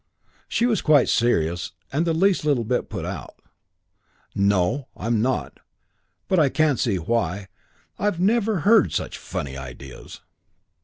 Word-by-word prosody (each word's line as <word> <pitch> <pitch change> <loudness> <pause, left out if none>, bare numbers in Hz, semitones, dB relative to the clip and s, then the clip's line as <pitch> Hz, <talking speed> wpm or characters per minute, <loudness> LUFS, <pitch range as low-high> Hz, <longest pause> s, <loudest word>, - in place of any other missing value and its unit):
She 235 - +1
was 225 -5 +1
quite 150 -4 +4
serious 90 -8 +1 0.2
and 160 +5 +1
the 165 - +2
least 190 +1 +2
little 145 -6 +1
bit 125 +3 -1
put 95 -6 -5
out. 90 -4 -7 1.0
"No 100 +6 +1
I'm 115 -1 0
not. 130 +2 -2 0.7
But 185 - +2
I 150 -3 +4
can't 150 -3 +1
see 110 -6 +1
why. 95 0 -2 0.5
I've 205 -4 0
never 210 -1 +2
heard 220 +5 +4
such - - -3
funny 70 -1 -5
ideas." 65 0 -10
120 Hz, 140 wpm, -23 LUFS, -, 1.0 s, quite